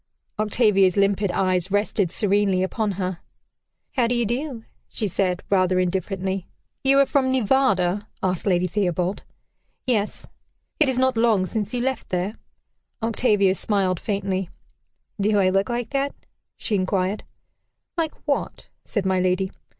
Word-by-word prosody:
Octavia's 210 Hz, -4 st, +3 dB
limpid 200 Hz, 0 st, +2 dB
eyes 185 Hz, -1 st, +1 dB
rested 205 Hz, -2 st, +1 dB
serenely 195 Hz, -1 st, +2 dB
upon 210 Hz, +2 st, -1 dB
her. 185 Hz, -2 st, -3 dB, 0.7 s
"How 245 Hz, -3 st, +2 dB
do 245 Hz, -, +1 dB
you 240 Hz, -1 st, +1 dB
do?" 245 Hz, +1 st, -3 dB, 0.3 s
she 215 Hz, -, -2 dB
said, 180 Hz, -1 st, 0 dB
rather 185 Hz, -2 st, +2 dB
indifferently. 190 Hz, +1 st, -2 dB, 0.4 s
"You 270 Hz, +1 st, +4 dB
are -, -, +5 dB
from 265 Hz, -1 st, +1 dB
Nevada?" 210 Hz, -6 st, +2 dB, 0.2 s
asked 185 Hz, +1 st, 0 dB
Lady 180 Hz, -1 st, +3 dB
Theobald. 180 Hz, 0 st, -1 dB, 0.6 s
"Yes." 215 Hz, -5 st, -1 dB, 0.5 s
"It 305 Hz, -4 st, +4 dB
is 260 Hz, -, 0 dB
not 260 Hz, -1 st, +2 dB
long 225 Hz, -5 st, +3 dB
since 210 Hz, +1 st, -3 dB
you 245 Hz, -, -1 dB
left 265 Hz, -1 st, -2 dB
there?" 185 Hz, +4 st, -1 dB, 0.7 s
Octavia 210 Hz, -4 st, +3 dB
smiled 190 Hz, -3 st, 0 dB
faintly. 195 Hz, -3 st, -2 dB, 0.7 s
"Do 205 Hz, +1 st, +2 dB
I 185 Hz, -2 st, +4 dB
look 195 Hz, +3 st, +1 dB
like 240 Hz, -1 st, -2 dB
that?" 280 Hz, 0 st, -1 dB, 0.4 s
she 225 Hz, -, -2 dB
inquired. 190 Hz, +1 st, 0 dB, 0.7 s
"Like 325 Hz, -3 st, -1 dB
what?" 285 Hz, -2 st, -2 dB
said 205 Hz, -4 st, -2 dB
my 190 Hz, -1 st, +2 dB
lady. 185 Hz, +1 st, +1 dB
200 Hz, 140 wpm, -23 LUFS, 185-235 Hz, 0.7 s, are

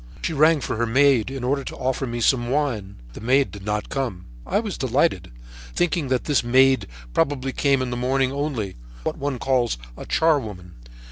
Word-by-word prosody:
She 165 Hz, -, -1 dB
rang 155 Hz, +1 st, +4 dB
for 115 Hz, -, -3 dB
her 120 Hz, +1 st, 0 dB
maid, 130 Hz, -1 st, +4 dB
in 135 Hz, -2 st, -5 dB
order 135 Hz, +2 st, 0 dB
to -, -, -7 dB
offer 130 Hz, +1 st, -2 dB
me 120 Hz, 0 st, -4 dB
some 120 Hz, 0 st, +2 dB
wine. 125 Hz, -9 st, -1 dB, 0.2 s
The -, -, -9 dB
maid 130 Hz, +4 st, +2 dB
did 100 Hz, -2 st, -10 dB
not 105 Hz, +1 st, -2 dB
come. 120 Hz, -10 st, -3 dB, 0.2 s
I -, -, +2 dB
was -, -, -4 dB
delighted, -, -, 0 dB, 0.4 s
thinking 175 Hz, -4 st, +1 dB
that 130 Hz, -1 st, 0 dB
this 145 Hz, -5 st, +1 dB
maid 130 Hz, +2 st, +4 dB, 0.3 s
probably 135 Hz, -, 0 dB
came 135 Hz, -1 st, +2 dB
in 125 Hz, -, -4 dB
the -, -, -2 dB
morning 130 Hz, +1 st, +1 dB
only, 135 Hz, -, -3 dB, 0.3 s
what -, -, -3 dB
one 140 Hz, -2 st, -2 dB
calls 125 Hz, -, +1 dB, 0.2 s
a -, -, -9 dB
charwoman. 110 Hz, -, 0 dB
130 Hz, 190 wpm, -23 LUFS, 120-140 Hz, 0.4 s, rang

